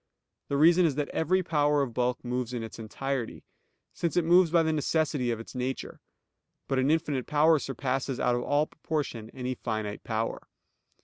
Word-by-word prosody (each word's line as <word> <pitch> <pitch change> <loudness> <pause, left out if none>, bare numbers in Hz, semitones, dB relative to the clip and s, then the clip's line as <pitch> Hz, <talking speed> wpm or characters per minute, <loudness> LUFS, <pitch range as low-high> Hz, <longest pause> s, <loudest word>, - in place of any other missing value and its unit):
The 140 - -1
reason 170 +4 +6
is 155 -5 +2
that 145 0 -2
every 185 +4 +1
power 150 -3 +2
of 125 -4 -5
bulk 125 +1 -1
moves 125 0 -2
in 115 - -3
its 115 +1 -8
entirety; 125 +3 -4 0.5
since 170 -1 -2
it 175 - +3
moves 175 +1 +5
by 165 0 +4
the 160 0 +1
necessity 150 -4 0
of 115 -1 -1
its 115 - -10
nature. 130 +1 -4 0.7
But 135 - +1
an 130 +2 +2
infinite 150 -5 0
power 155 +1 +4
surpasses 135 0 -2
out 125 - +2
of 120 - 0
all 145 +4 +2
proportion 145 -9 -4
any 130 0 -4
finite 110 -4 -4
power. 110 0 -3
135 Hz, 180 wpm, -28 LUFS, 125-155 Hz, 0.7 s, reason